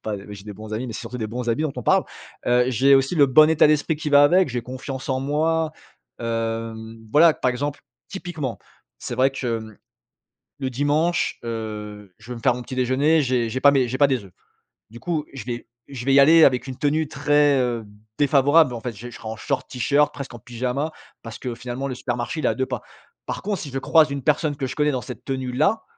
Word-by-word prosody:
pas, 110 -1 -3
heu 100 - -11
j'ai 100 -1 -9
des 105 - -7
bons 110 +2 -8
amis 125 +4 -3
mais - - -5
c'est - - -6
surtout 120 +1 -7
des 110 -2 -3
bons 120 +2 -4
habits 115 +6 +1
dont 155 -3 -1
on 125 - -4
parle. - - +4 0.4
Heu, 125 0 +4
j'ai 135 +3 +5
aussi 135 +5 0
le 145 -4 +5
bon 155 +4 +6
état 160 -1 +5
d'esprit 150 +1 +2
qui 150 0 -4
va 145 0 +7
avec. 180 +4 +4
J'ai 125 -1 -3
confiance 130 +1 -7
en 130 -1 0
moi, 155 +3 0 0.5
hem, 115 -1 -4
voilà, 160 +1 +6
par 125 - 0
exemple: 145 +3 -3 0.3
typiquement, 160 - -5 0.4
c'est - - -5
vrai 130 +2 +3
que, 125 -4 -2
mmh, 110 -2 -12 0.8
le 130 -1 -2
dimanche, 150 +7 0
heu, 105 -4 -6
je 115 +3 -14
vais 120 - -4
me - - -9
faire 125 0 +3
mon 125 - -6
petit 130 - -8
déjeuner, 135 +5 +2
j'ai 125 -3 0
j'ai 130 +3 -3
pas 140 +1 +6
mes 130 -3 +2
j'ai 130 +2 -3
pas 145 - +6
des 130 -7 -1
œufs. 95 - -16 0.6
Du 115 +2 -12
coup, 165 -4 -2
je 130 -6 -8
vais 120 -1 -5 0.2
je 130 -4 -7
vais 135 - +3
y 140 - +7
aller 160 +3 +7
avec 130 0 +3
une 130 - -6
tenue 150 +3 0
très, 145 0 +2
heu, 120 -3 -1 0.3
défavorable, 145 0 +4
en 115 - -6
fait, 120 -2 -4
j'ai 115 +4 -9
je 120 - -12
serai 110 - -8
en 110 - -6
short, - - -3
T-shirt, 140 +4 +1
presqu'en 135 -4 -7
pyjama. 125 +6 -3 0.3
Parce 115 -1 -8
que 125 -2 -5
finalement 125 +3 -5
le 130 - -4
supermarché 125 +4 -3
il - - -2
est - - +4
à - - -1
2 130 - -1
pas. - - -4 0.4
Par - - -4
contre, 200 -2 -2
si 145 - -6
je 135 0 -3
croise 155 +2 +4
une 140 - -3
personne 150 +1 +1
que 135 -2 -2
je 130 - -6
connais 150 -1 +2
dans 130 -3 -2
cette 125 -3 -9
tenue-là, 130 - 0
130 Hz, 240 wpm, -23 LUFS, 120-145 Hz, 0.8 s, va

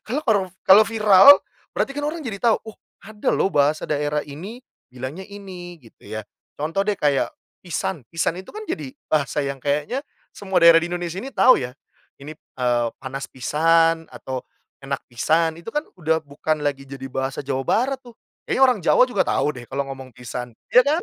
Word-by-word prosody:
Karena 295 +6 -2
kalau 200 -6 +2 0.2
kalau 205 +3 +8
viral, 215 +4 +8 0.4
berarti 275 - 0
kan 290 - -4
orang 310 0 -3
jadi 200 -5 -5
tahu, 230 -2 +4
oh 220 -2 -10 0.3
ada 210 0 -4
loh 195 - +2
bahasa 145 +2 +2
daerah 150 0 -1
ini, 195 - -9 0.2
bilangnya 130 +9 -7
ini. 185 -3 -9
Gitu 115 - -20 0.2
ya. 110 - -5 0.3
Contoh 160 +6 -2
deh 200 0 0
kayak 145 -6 +1 0.3
"pisan". 170 -5 -4
"Pisan" 165 +2 -1
itu - - -16
kan 435 - -6
jadi 150 - -4 0.2
bahasa 150 -1 0
yang 140 -1 -4
kayaknya 150 - -1 0.3
semua 190 -4 0
daerah 165 0 +9
di 170 - -3
Indonesia 175 +1 -4
ini 270 - -6
tahu 255 - +6
ya. 125 +1 -6 0.4
Ini, 145 +3 -9
eee, 120 -5 -1
"panas 135 +1 -5
pisan", 165 +5 +2
atau 130 -1 -6 0.4
"enak 135 0 -3
pisan", 160 +6 +1
itu 170 - -13
kan 295 - 0
udah 160 -1 +1
bukan 150 +2 -2
lagi 140 -1 -2
jadi 135 -1 -7
bahasa 135 0 -2
Jawa 135 -1 -2
Barat 265 +3 +1
tuh. 240 -3 -16 0.3
Kayaknya 265 - +1
orang 250 -4 +3
Jawa - - +5
juga 205 -6 +1
tahu - - +1
deh 120 - -10
kalau 140 +1 -2
ngomong 130 -1 -10
"pisan". 125 -1 -6 0.2
Iya 250 - +8
kan? 350 - -3
165 Hz, 185 wpm, -22 LUFS, 140-205 Hz, 0.4 s, daerah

